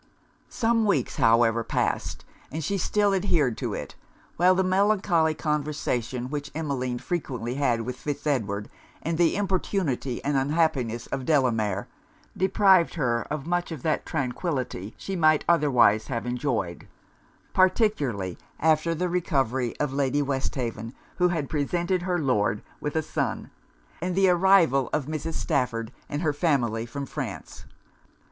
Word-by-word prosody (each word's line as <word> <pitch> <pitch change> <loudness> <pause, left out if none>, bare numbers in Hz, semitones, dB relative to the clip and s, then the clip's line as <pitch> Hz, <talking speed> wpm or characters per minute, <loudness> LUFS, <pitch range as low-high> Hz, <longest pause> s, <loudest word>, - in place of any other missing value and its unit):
Some 230 -2 +1
weeks, 145 -11 0
however, 115 0 +4
passed, - - -2 0.3
and 155 +3 -4
she 200 +6 -1
still 205 +2 +2
adhered 165 - +2
to - - -2
it; - - -6 0.4
while 180 +2 +4
the 190 - +2
melancholy 185 -4 +2
conversation 140 -5 -2
which 150 0 -4
Emmeline 135 -6 -2
frequently 125 -6 -3
had 125 -4 +1
with 125 +2 -5
Fitz 145 0 -5
Edward, 105 -8 -1 0.4
and 165 +1 -2
the 170 -2 +4
importunity 185 -9 -1
and 145 +1 0
unhappiness 135 -5 0
of 135 - -4
Delamere, 115 -9 +1 0.5
deprived 190 -2 +4
her 120 -6 0
of 150 -2 -3
much 175 +1 -1
of 155 -6 -6
that 155 -2 0
tranquillity 130 - -3
she 195 - -5
might 155 -3 +3
otherwise 135 -10 +4
have 120 -3 -3
enjoyed; 125 -8 -2 0.7
particularly 150 - +1 0.2
after 160 +1 +2
the 180 +3 -1
recovery 135 -9 0
of 145 -3 -1
Lady 140 +1 +1
Westhaven 130 -4 -3 0.2
(who 180 0 +3
presented 170 +6 -1
her 180 0 0
Lord 105 - +1 0.2
with 150 - -4
a 160 - +1
son), - - -3 0.5
and 180 0 -2
the 190 0 +4
arrival 175 -8 +4
of 150 -3 0
Mrs. 155 +2 -4
Stafford 125 -7 -1 0.2
and 145 +3 -3
her 150 -3 +1
family 120 -8 0
from 140 +4 -5
France. - - -6
145 Hz, 140 wpm, -26 LUFS, 125-175 Hz, 0.7 s, however